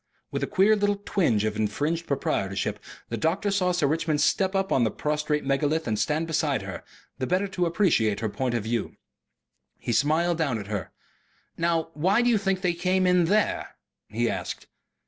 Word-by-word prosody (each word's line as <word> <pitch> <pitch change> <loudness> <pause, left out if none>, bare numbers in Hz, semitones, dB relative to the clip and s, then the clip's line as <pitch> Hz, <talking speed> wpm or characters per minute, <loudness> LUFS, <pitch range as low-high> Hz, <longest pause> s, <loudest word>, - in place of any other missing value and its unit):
With - - -2
a - - -1
queer 205 +2 +4
little 205 -1 0
twinge 120 - +1
of 110 0 -1
infringed 145 +11 -1
proprietorship, 100 -6 -1 0.3
the 115 - -3
doctor 185 - 0
saw 185 -2 +2
Sir 175 -4 +1
Richmond 155 +1 0
step 190 +6 +2
up 195 0 0
on 130 - +3
the 110 - +2
prostrate 150 +1 -1
megalith 145 +3 0
and 110 -2 0
stand 150 +9 0
beside 150 -7 0
her, 95 -1 -7 0.4
the 130 - -1
better 185 +3 +1
to 180 -2 0
appreciate 165 - +2
her 110 - -1
point 125 +3 -2
of 115 - -1
view. 115 0 -2 0.8
He 120 - -3
smiled 160 +7 +2
down 140 -8 +1
at 105 - -6
her. 95 -5 -3 0.7
"Now 165 -1 0
why 190 +10 +2
do 245 - +3
you 220 - +3
think 195 -2 0
they 180 -2 +1
came 185 +2 +1
in 180 -1 +4
THERE?" 210 +5 0 0.3
he - - 0
asked. - - -4
160 Hz, 185 wpm, -26 LUFS, 120-185 Hz, 0.8 s, queer